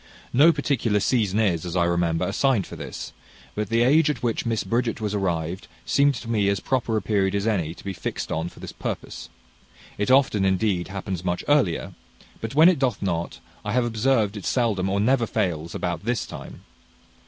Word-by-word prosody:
No 150 +7 +7
particular 130 -8 0
season 105 -2 +1
is, 90 -7 +1
as 90 0 -5
I 90 - +3
remember, 85 -1 +1
assigned 130 -8 +1
for - - -9
this; 70 -5 -7 0.4
but 105 -1 -3
the 115 +1 +3
age 150 +5 +4
at 150 - -3
which 115 0 -1
Miss 115 -2 0
Bridget 115 -1 -1
was 105 -2 -2
arrived, 90 -3 -2 0.2
seems 140 -2 +3
to - - -10
me 105 -4 +1
as 100 - 0
proper 120 -4 0
a - - -2
period 100 -2 +1
as 100 0 -1
any 90 -7 0
to - - -14
be 100 - -4
fixed 85 - -5
on 80 +2 -2
for - - -17
this - - -7
purpose: - - -6 0.7
it 105 - 0
often, 130 -6 +4
indeed, 95 -1 +1
happens 95 -2 -5
much 90 -1 -1
earlier; 135 - +2 0.5
but 115 +4 -5
when 160 +3 +8
it 180 -5 +4
doth 130 -6 0
not, 85 -3 -2 0.2
I 105 -1 -3
have 125 0 +2
observed 110 -2 +1
it 100 - -7
seldom 105 -7 +1
or 100 +1 0
never 120 +2 +2
fails 85 -4 -2
about 85 -1 -3
this 120 +2 -1
time. - - -10
105 Hz, 200 wpm, -24 LUFS, 90-120 Hz, 0.7 s, when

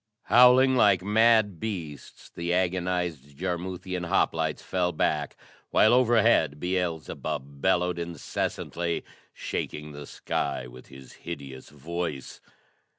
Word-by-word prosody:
Howling 125 +4 +6
like 100 -7 +4
mad 110 -2 +3
beasts, 85 -10 -7
the 85 +1 -4
agonized 90 -6 -2
Jarmuthian 90 +1 -4
hoplites 95 - 0
fell 90 -1 0
back, 75 -2 -1 0.3
while 110 - +5
overhead 115 - +3
Beelzebub 80 -6 -3
bellowed 90 -1 +1
incessantly, 85 0 -3 0.3
shaking 75 0 -5
the 75 -1 -9
sky - - -3
with 60 +1 -13
his 65 -1 -13
hideous 70 -6 -8
voice. 75 -1 -5
90 Hz, 100 wpm, -27 LUFS, 75-95 Hz, 0.3 s, Howling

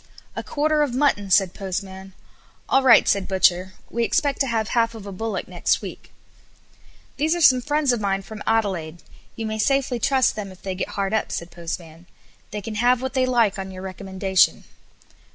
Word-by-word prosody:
"A - - -3
quarter 305 +1 0
of 275 -5 0
mutton," 255 -8 +1
said 190 -1 +4
Postman. 190 0 -6 0.5
"All 270 - +4
right," 260 -3 +6
said 195 -2 +1
butcher, 185 -1 +2 0.2
"we 235 - 0
expect 280 +3 0
to 270 - +2
have 225 -3 -1
half 230 -1 +1
of 215 -3 -9
a 200 - -7
bullock 210 +1 -4
next - - 0
week." - - -9 1.1
"These 315 +3 +1
are - - -2
some 255 -5 +6
friends 295 -1 +1
of 235 - -2
mine 195 -1 -1
from 215 +1 -9
Adelaide; 180 -7 -1 0.3
you 225 - -4
may 220 0 -3
safely 270 0 +1
trust 260 +2 +2
them 200 -3 -6
if 185 - -16
they 190 - -3
get 185 - -4
hard 195 0 -1
up," 220 - 0
said 170 0 -5
Postman. 170 0 -7 0.4
"They 210 - -5
can 220 +2 -6
have 250 +1 +3
what 260 - -3
they 260 -1 +1
like 230 -6 +2
on 190 0 -5
your 185 0 -9
recommendation." 190 0 +1
210 Hz, 190 wpm, -23 LUFS, 190-250 Hz, 1.1 s, right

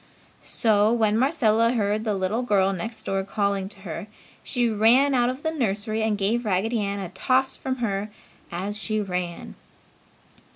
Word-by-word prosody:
So, 215 -1 +2
when 220 -3 +2
Marcella 230 -3 +3
heard 215 -1 0
the 210 -2 0
little 195 +5 -1
girl 195 -5 +2
next 220 +5 -5
door 195 0 -1
calling 200 -1 -1
to 200 -1 -12
her, 185 +2 -6 0.4
she 245 -3 0
ran 230 +6 +4
out 245 -1 +3
of 260 +3 -5
the 320 - 0
nursery 220 -6 -1
and 220 -1 +1
gave 215 +5 0
Raggedy 215 +3 0
Ann 200 0 -2
a 190 -3 -5
toss 255 +8 +1
from 260 -1 -3
her 200 0 -2 0.4
as 195 +5 -4
she 215 0 -1
ran. 180 -4 -4
215 Hz, 165 wpm, -25 LUFS, 195-235 Hz, 0.4 s, ran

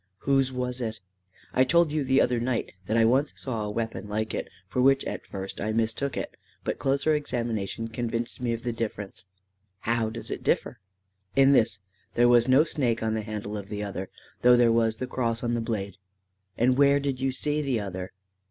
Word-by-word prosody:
"Whose 135 -1 +2
was 125 0 -3
it?" 110 -2 -3 0.5
"I 130 - +5
told 170 +3 +3
you 150 -1 0
the 135 +1 +4
other 125 -1 +2
night 120 -1 -1 0.2
that 110 - +1
I 115 - +5
once 135 +5 +2
saw 115 -5 -3
a - - -3
weapon 110 -1 -3
like 110 +1 -2
it, - - -3 0.2
for 100 +7 0
which 135 +1 +4
at - - -5
first 95 -1 -6
I 110 +2 -1
mistook 115 +5 0
it, - - -5 0.3
but - - -2
closer 140 +3 +2
examination 115 -7 -2
convinced 115 +1 -3
me 120 -1 0
of 115 0 -3
the 120 -1 -1
difference." 105 -4 -5 0.6
"How 115 -1 0
does 115 +1 -7
it - - -4
differ?" - - 0 0.6
"In 135 0 +6
this. 110 -7 +3 0.3
There 120 0 +5
was 120 0 +5
no 130 +3 +6
snake 120 -8 0
on 110 0 0
the 110 - -1
handle 105 -1 -5
of 100 -1 -6
the 105 -1 -3
other, 95 -2 -5 0.3
though 125 0 +7
there 120 -1 +5
was 115 -1 +2
the 130 - -3
cross 120 -2 -2
on 120 0 0
the 120 - 0
blade." 105 -4 -3 0.6
"And 125 +2 +3
where 140 0 +6
did 140 -2 -2
you 135 0 +1
see 150 +3 0
the 135 -5 0
other?" 95 -2 -5
115 Hz, 205 wpm, -27 LUFS, 110-130 Hz, 0.6 s, though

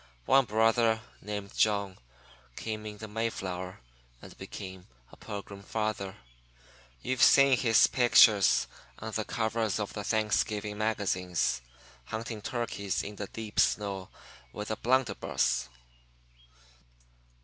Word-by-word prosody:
One 135 0 +5
brother, 115 +1 +3 0.2
named 105 -1 -6
John, 100 -3 +1 0.6
came 110 -1 -5
in 105 -1 -8
the 110 - -7
Mayflower 95 - -4 0.4
and - - -13
became 95 -1 -9 0.2
a - - -13
Pilgrim 100 -1 -8
Father. 105 -2 -3 0.9
You've 130 0 -1
seen 140 -1 +7
his 115 -3 +5
picture 115 -4 +6 0.6
on 110 0 -6
the 110 0 -1
covers 110 -2 -1
of 105 - -3
the 105 - -5
Thanksgiving 105 -1 0
magazines, 90 - 0 0.4
hunting 110 0 -5
turkeys 115 -6 -2
in 105 0 -7
the 105 - -4
deep 110 0 -5
snow 100 -3 +1 0.4
with 105 +1 -5
a - - 0
blunderbuss. 120 - 0
105 Hz, 115 wpm, -30 LUFS, 100-115 Hz, 0.9 s, seen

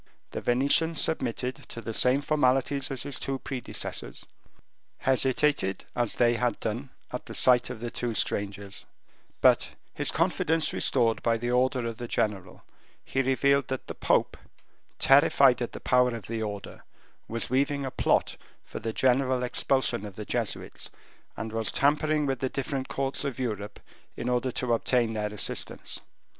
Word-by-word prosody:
The - - -4
Venetian 140 +6 +3
submitted 125 -5 +1
to - - -6
the 115 -1 -5
same 130 +5 +4
formalities 135 -1 +1
as 135 -3 -2
his 140 -1 -2
two 135 0 -2
predecessors, 125 - -5 0.7
hesitated 130 -5 +1
as 120 -2 0
they 120 -1 +3
had 125 0 0
done 120 +5 -3 0.2
at 125 - -6
the - - -6
sight 125 -1 +5
of 125 -3 -6
the 120 0 -4
two 120 -2 -3
strangers, 100 0 -2 0.5
but - - +4 0.2
his - - +4
confidence 160 0 +1
restored 115 -4 +4
by 115 -1 +1
the 120 +2 -2
order 125 0 +1
of 115 -1 -4
the 120 - -6
general, 100 -5 -2 0.4
he 135 - 0
revealed 140 +1 +2
that 130 -1 -4
the - - -6
pope, - - +1 0.6
terrified 135 -2 +5
at 120 - -2
the - - -8
power 125 -1 +2
of 110 -5 -8
the 115 +1 -4
order, 100 -2 -6 0.4
was 115 +1 -4
weaving 140 +1 +1
a 130 - -4
plot - - +1 0.3
for - - -7
the 115 - -4
general 130 0 +2
expulsion 125 -3 0
of 105 -3 -8
the 105 - -7
Jesuits, - - -3 0.5
and 110 0 -5
was 115 -1 0
tampering 150 +1 +2
with 135 -2 -1
the 130 - -1
different 135 0 -3
courts 135 0 -2
of 140 -3 -3
Europe 105 -5 -4 0.4
in 120 - -3
order 125 +1 0
to 120 0 0
obtain 115 0 +1
their 105 -1 -2
assistance. 105 - -2
125 Hz, 160 wpm, -27 LUFS, 115-135 Hz, 0.7 s, sight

